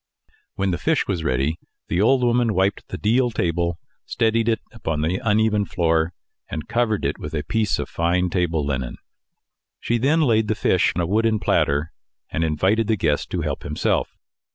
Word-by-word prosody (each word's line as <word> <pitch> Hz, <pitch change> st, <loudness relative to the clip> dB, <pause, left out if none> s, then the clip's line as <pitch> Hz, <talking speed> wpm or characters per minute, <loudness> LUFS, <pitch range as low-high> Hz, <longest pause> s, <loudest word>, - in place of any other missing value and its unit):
When 95 Hz, -1 st, 0 dB
the 85 Hz, -, -2 dB
fish 160 Hz, -2 st, +1 dB
was 90 Hz, -5 st, -2 dB
ready, 70 Hz, +3 st, 0 dB, 0.3 s
the 90 Hz, -, 0 dB
old 125 Hz, +4 st, +4 dB
woman 120 Hz, -2 st, +2 dB
wiped 95 Hz, +2 st, 0 dB
the -, -, -6 dB
deal 120 Hz, +4 st, +2 dB
table, 85 Hz, -5 st, -1 dB, 0.3 s
steadied 115 Hz, 0 st, +1 dB
it 110 Hz, -, +1 dB
upon 80 Hz, -10 st, -3 dB
the 85 Hz, +9 st, -1 dB
uneven 110 Hz, -1 st, +2 dB
floor, 80 Hz, -3 st, +1 dB, 0.4 s
and 80 Hz, -1 st, -5 dB
covered 115 Hz, -3 st, 0 dB
it -, -, -1 dB
with 75 Hz, +1 st, -6 dB
a 75 Hz, -, -2 dB
piece 105 Hz, +5 st, 0 dB
of -, -, -3 dB
fine 90 Hz, +2 st, 0 dB
table 85 Hz, -5 st, 0 dB
linen. 65 Hz, -3 st, -3 dB, 0.8 s
She 120 Hz, 0 st, 0 dB
then 150 Hz, +7 st, +3 dB
laid 110 Hz, -6 st, +3 dB
the 110 Hz, -, 0 dB
fish 95 Hz, -2 st, +2 dB
on 90 Hz, -, 0 dB
a -, -, 0 dB
wooden 110 Hz, +4 st, +2 dB
platter, 80 Hz, -5 st, +1 dB, 0.4 s
and 80 Hz, -, -1 dB
invited 95 Hz, +8 st, +1 dB
the 110 Hz, -, +2 dB
guest 75 Hz, -5 st, 0 dB
to -, -, -2 dB
help -, -, -3 dB
himself. 75 Hz, +1 st, -1 dB
95 Hz, 180 wpm, -22 LUFS, 80-115 Hz, 0.8 s, old